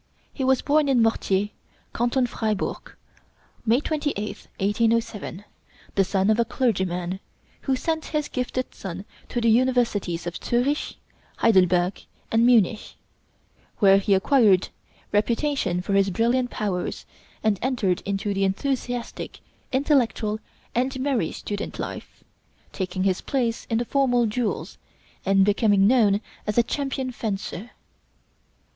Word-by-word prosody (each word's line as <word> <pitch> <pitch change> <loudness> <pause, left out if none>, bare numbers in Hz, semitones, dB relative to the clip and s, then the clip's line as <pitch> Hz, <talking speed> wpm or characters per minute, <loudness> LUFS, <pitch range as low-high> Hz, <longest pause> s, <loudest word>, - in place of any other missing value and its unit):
He 270 - -3
was 265 0 +3
born 295 0 +3
in 250 -4 +4
Mortier, 205 -3 +1 0.4
Canton 245 +2 +1
Fribourg, 220 -4 -3 0.7
May 235 +3 +5
28th, 290 -10 -3
1807, 210 -1 0 0.5
the 195 - +3
son 195 +2 +1
of 220 - +2
a - - +5
clergyman, 190 -7 -1 0.4
who 270 - 0
sent 320 +4 -2
his 300 -2 -2
gifted 255 0 -3
son 190 +1 -7 0.2
to 240 - -1
the 230 -1 +3
Universities 230 -8 +1
of 175 0 -4
Zürich, 255 +5 0 0.4
Heidelberg, 180 -3 +3 0.3
and 230 +1 +4
Munich, 225 -3 +3 0.8
where 195 -2 +6
he 200 0 +3
acquired 200 -3 +4 0.4
reputation 215 - +1
for 200 - -2
his 195 0 +4
brilliant 240 +5 +1
powers, 195 -6 -3 0.4
and 215 -3 +2
entered 225 -8 0
into 200 +1 -2
the 195 0 0
enthusiastic, 245 +4 -2 0.3
intellectual, 250 -6 +1 0.3
and 260 +2 0
merry 260 - 0
student 205 -1 -5
life, - - -7 0.5
taking 185 -1 -2
his 190 -2 +1
place 240 -4 -1
in 225 - +1
the 240 - 0
formal 245 -2 +2
duels, 225 +1 -2 0.5
and 195 0 +5
becoming 205 -1 +3
known 210 -3 +4 0.3
as 210 - -1
a 235 - +6
champion 265 0 -2
fencer. 210 -2 -4
225 Hz, 125 wpm, -24 LUFS, 195-255 Hz, 0.8 s, where